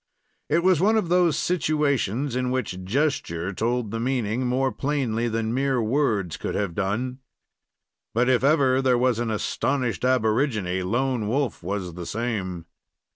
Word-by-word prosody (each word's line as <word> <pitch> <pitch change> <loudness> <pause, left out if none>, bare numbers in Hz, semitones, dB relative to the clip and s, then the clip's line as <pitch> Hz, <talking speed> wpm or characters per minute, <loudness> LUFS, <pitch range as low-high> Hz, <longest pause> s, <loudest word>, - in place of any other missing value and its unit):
It 165 +3 +2
was 185 -3 +4
one 215 +3 +4
of 180 -6 0
those 175 -4 +3
situations 145 - 0
in 125 0 0
which 125 -8 -3
gesture 100 - -1
told 115 +1 -1
the 115 - -3
meaning 125 -1 -1
more 130 +2 +1
plainly 130 -5 -1
than 115 0 -1
mere 135 0 +1
words 110 - 0
could - - -4
have 100 -4 -1
done. 110 +8 -2 0.9
But 120 +2 +1
if 130 -1 +3
ever 135 -3 +4
there 130 -2 +3
was 125 -2 +2
an 120 -1 -1
astonished 125 +3 -1
aborigine, 110 -6 +1
Lone 120 +3 0
Wolf 130 +1 -1
was 90 -1 -4
the 85 0 -7
same. 100 -7 -3
125 Hz, 150 wpm, -24 LUFS, 105-135 Hz, 0.9 s, was